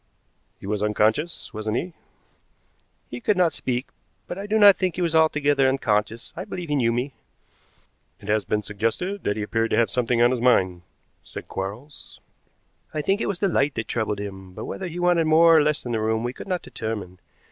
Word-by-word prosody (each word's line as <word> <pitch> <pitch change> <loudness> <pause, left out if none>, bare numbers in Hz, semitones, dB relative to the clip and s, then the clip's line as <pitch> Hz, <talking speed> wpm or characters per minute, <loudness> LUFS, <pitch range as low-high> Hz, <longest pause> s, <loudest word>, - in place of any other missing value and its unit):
"He - - -11
was 105 +1 -2
unconscious, 110 +10 0
wasn't 110 +1 -2
he?" 175 +4 -4 1.2
"He 120 - -6
could 210 - +1
not 175 -4 +3
speak, 125 -1 -2 0.4
but - - -6
I 200 +2 -6
do 215 +1 +1
not 205 -2 +8
think 185 -2 -1
he 180 - -3
was 165 -1 0
altogether 145 -4 +3
unconscious. 115 -3 -1
I - - -5
believe 175 -3 -6
he 145 - +1
knew 120 -4 +2
me." 125 +4 -2 1.1
"It 100 - -13
has 110 0 +1
been 105 0 -1
suggested 115 - -2
that 105 - 0
he 105 - -2
appeared 115 +2 0
to - - +1
have 115 -4 +2
something 120 0 +1
on 120 +1 +5
his 125 -2 -1
mind," 95 -8 +3 0.4
said - - -9
Quarles. 110 +10 -7 0.8
"I 150 - -1
think 195 +6 +1
it - - -1
was 190 -3 -3
the 200 - +3
light 145 -5 +1
that 115 - -3
troubled 110 -3 -2
him, 95 -2 -8
but - - -7
whether 190 - -5
he 170 0 -7
wanted 175 -2 +3
more 165 +1 +6
or 155 - +6
less 150 -1 0
in 120 - -3
the 110 -2 -1
room 110 +1 0
we 120 +1 -2
could - - -10
not 180 -2 -2
determine. 105 -5 -6
125 Hz, 210 wpm, -24 LUFS, 110-165 Hz, 1.2 s, not